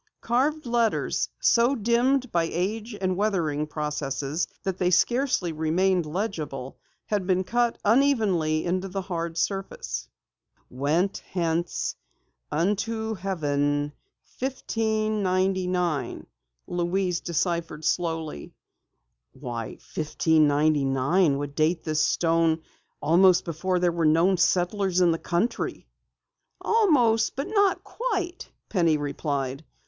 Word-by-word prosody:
Carved 280 Hz, +6 st, 0 dB
letters, 235 Hz, -2 st, 0 dB
so 245 Hz, -, +4 dB
dimmed 245 Hz, +3 st, +1 dB
by 170 Hz, -1 st, +2 dB
age 210 Hz, +5 st, -3 dB
and 185 Hz, -1 st, 0 dB
weathering 170 Hz, -7 st, 0 dB
processes 150 Hz, 0 st, -2 dB, 0.2 s
that 190 Hz, -2 st, -3 dB
they 180 Hz, -, +2 dB
scarcely 235 Hz, -1 st, +2 dB
remained 170 Hz, +3 st, +1 dB
legible, 155 Hz, -, -4 dB, 0.3 s
had 205 Hz, -3 st, -1 dB
been 185 Hz, -1 st, +2 dB
cut 235 Hz, +4 st, 0 dB
unevenly 205 Hz, -, +2 dB
in 180 Hz, +1 st, +1 dB
the 195 Hz, +1 st, -4 dB
hard 170 Hz, -2 st, -4 dB
surface. 165 Hz, -, -3 dB, 0.6 s
"'Went 155 Hz, +9 st, 0 dB
hence 170 Hz, -1 st, -1 dB, 0.6 s
vnto 220 Hz, +6 st, -1 dB
heaven 145 Hz, -6 st, -1 dB, 0.5 s
1599,'" 190 Hz, -, -1 dB, 0.4 s
Louise 175 Hz, 0 st, -1 dB
deciphered 170 Hz, -2 st, -2 dB
slowly. 160 Hz, -, -2 dB, 0.8 s
"Why, 120 Hz, -4 st, -5 dB, 0.3 s
1599 150 Hz, 0 st, +2 dB
would 145 Hz, 0 st, -4 dB
date 160 Hz, +3 st, +1 dB
this 155 Hz, -1 st, 0 dB
stone 165 Hz, -1 st, +2 dB, 0.4 s
almost 180 Hz, +4 st, +5 dB
before 180 Hz, +2 st, -1 dB
there 175 Hz, -1 st, +2 dB
were 165 Hz, -1 st, 0 dB
known 170 Hz, +5 st, +4 dB
settlers 180 Hz, +2 st, +1 dB
in 175 Hz, -2 st, +5 dB
the 165 Hz, -, -1 dB
country!" 180 Hz, +7 st, -2 dB, 0.7 s
"Almost 285 Hz, -, +3 dB
but 275 Hz, +8 st, -3 dB
not 405 Hz, -2 st, +2 dB
quite," 375 Hz, -7 st, -3 dB, 0.2 s
replied 145 Hz, -, 0 dB
Penny. -, -, -27 dB
180 Hz, 100 wpm, -26 LUFS, 155-215 Hz, 0.8 s, almost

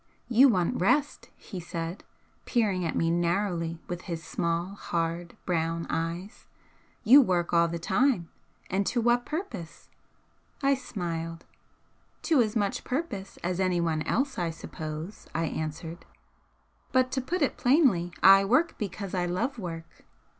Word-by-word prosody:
"You 255 Hz, +3 st, +7 dB
want 180 Hz, -6 st, +1 dB
rest," 275 Hz, +9 st, +1 dB
he 190 Hz, -, -8 dB
said, 170 Hz, +1 st, -5 dB, 0.4 s
peering 205 Hz, -7 st, +1 dB
at 165 Hz, -, -2 dB
me 165 Hz, 0 st, +2 dB
narrowly 170 Hz, -1 st, 0 dB
with 175 Hz, 0 st, -4 dB
his 170 Hz, -4 st, -5 dB
small 170 Hz, +2 st, -1 dB
hard 170 Hz, -2 st, -3 dB
brown 165 Hz, -1 st, -1 dB
eyes 170 Hz, +5 st, -4 dB, 0.6 s
"You 255 Hz, +5 st, +9 dB
work 175 Hz, -8 st, 0 dB
all 170 Hz, 0 st, +5 dB
the 170 Hz, 0 st, -3 dB
time. 200 Hz, +1 st, +1 dB, 0.4 s
And 195 Hz, +2 st, 0 dB
to 245 Hz, -, +1 dB
what 240 Hz, +1 st, +2 dB
purpose?" 245 Hz, -, -6 dB, 0.7 s
I 275 Hz, 0 st, +5 dB
smiled. 170 Hz, -10 st, -4 dB, 0.8 s
"To 310 Hz, -7 st, +4 dB
as 215 Hz, -1 st, 0 dB
much 200 Hz, -3 st, 0 dB
purpose 250 Hz, -, -4 dB
as 180 Hz, +1 st, -1 dB
anyone 170 Hz, -4 st, +1 dB
else, 270 Hz, -1 st, 0 dB
I 170 Hz, -1 st, 0 dB
suppose," 160 Hz, +2 st, -7 dB
I 165 Hz, -, +1 dB
answered 160 Hz, +2 st, -5 dB, 0.9 s
"But 255 Hz, 0 st, +3 dB
to 265 Hz, -, 0 dB
put 320 Hz, +6 st, -1 dB
it 280 Hz, -, +1 dB
plainly, 245 Hz, -, +3 dB
I 195 Hz, +1 st, +9 dB
work 255 Hz, +12 st, +2 dB
because 200 Hz, -1 st, -4 dB
I 180 Hz, -2 st, 0 dB
love 230 Hz, +9 st, -2 dB
work." 165 Hz, -3 st, -8 dB
180 Hz, 140 wpm, -28 LUFS, 170-240 Hz, 0.9 s, You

